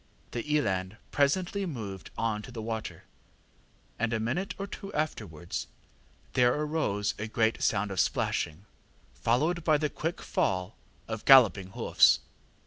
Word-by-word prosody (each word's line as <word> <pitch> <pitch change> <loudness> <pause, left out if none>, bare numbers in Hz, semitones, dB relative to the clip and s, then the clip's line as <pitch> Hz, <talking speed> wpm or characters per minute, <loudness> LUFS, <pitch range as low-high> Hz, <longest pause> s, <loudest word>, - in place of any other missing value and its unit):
The 120 +5 -4
eland 95 -5 -1
presently 185 +7 +1
moved 105 - -6
on 110 -2 -1
to 115 - -10
the 120 - -7
water, 110 -1 -5 1.0
and 115 +1 0
a 110 - 0
minute 130 - -2
or 195 - -3
two 195 0 -8
afterwards 100 - -3 0.7
there 125 -1 +4
arose 150 -10 0
a 105 - -3
great 110 0 +1
sound 105 -1 +1
of 95 - -3
splashing, 80 +6 0 0.5
followed 155 +9 +1
by 155 -2 +4
the 150 -1 -1
quick 165 +3 -3
fall 95 +2 -1 0.3
of 110 -1 -5
galloping 100 -8 +6
hoofs. - - +5
115 Hz, 135 wpm, -29 LUFS, 105-150 Hz, 1.0 s, galloping